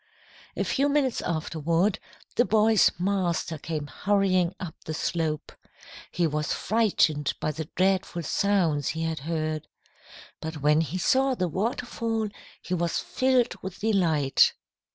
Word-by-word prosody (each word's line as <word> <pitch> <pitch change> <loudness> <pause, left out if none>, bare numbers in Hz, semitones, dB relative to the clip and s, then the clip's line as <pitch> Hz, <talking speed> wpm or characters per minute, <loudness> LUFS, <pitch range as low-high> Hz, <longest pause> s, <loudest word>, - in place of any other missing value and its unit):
"A - - +1
few 280 +2 +1
minutes 280 -4 +1
afterward, 165 +3 0 0.4
the 240 - +5
boy's 220 -2 +4
master 175 -3 -1
came 155 -1 -4
hurrying 185 +3 +1
up 175 -4 -5
the 155 - -4
slope. 160 -2 -2 0.6
He 175 - 0
was 150 -1 -1
frightened 175 -10 +1
by 155 - -1
the 155 +1 -5
dreadful 185 -2 +1
sounds 170 -7 +1
he 160 +1 -2
had 160 -2 -2
heard. 155 0 -3 0.7
But 160 0 -5
when 150 +2 +4
he 165 +3 -3
saw 265 +7 +2
the 185 -5 0
waterfall, 225 +3 -2 0.3
he 185 - -4
was 170 -1 0
filled 255 -2 +1
with 190 -1 -6
delight. 165 -10 +3
175 Hz, 130 wpm, -26 LUFS, 155-205 Hz, 0.7 s, the